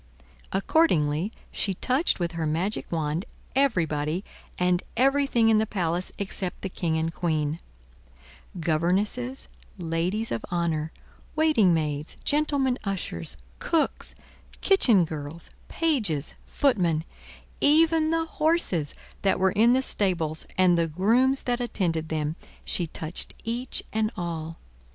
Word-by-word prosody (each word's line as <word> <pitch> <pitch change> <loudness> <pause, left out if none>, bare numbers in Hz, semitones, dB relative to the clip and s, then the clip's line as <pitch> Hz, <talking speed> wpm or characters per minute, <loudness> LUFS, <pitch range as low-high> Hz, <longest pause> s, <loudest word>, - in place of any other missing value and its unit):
Accordingly, 190 - +2 0.2
she 195 -2 -1
touched 260 - +1
with 170 -1 -1
her 165 -2 -2
magic 175 +7 -1
wand 160 +1 -1 0.3
everybody 170 - +1 0.3
and 180 0 +2 0.2
everything 270 -3 +3
in 220 -1 +5
the 220 - 0
palace 180 -3 -2
except 190 -2 -4
the 195 - -2
King 165 -3 -1
and 165 +1 -1
Queen: 155 -2 -1 1.0
governesses, 190 +11 0 0.3
ladies 180 +6 -2
of 115 - -2
honor, 165 -3 -1 0.4
waiting 305 - +4
maids, 150 -2 -2
gentlemen 285 -4 +1
ushers, 85 - -4 0.2
cooks, 325 -2 -1 0.4
kitchen 235 - +5
girls, 155 +1 -7 0.2
pages, 220 - 0
footmen; 180 - +1 0.6
even 315 +1 +4
the 325 0 +1
horses 310 - +1 0.3
that 195 - +2
were 190 0 +3
in 230 +5 +4
the 260 +1 +2
stables, 170 -9 -1
and 180 -2 +4
the 165 - +2
grooms 235 - +2
that 245 0 -1
attended 165 -9 -1
them, 155 0 -1 0.3
she 175 - 0
touched 160 +2 -3
each 240 +3 -1
and 215 0 +1
all. 165 -2 -4
185 Hz, 120 wpm, -26 LUFS, 160-245 Hz, 1.0 s, in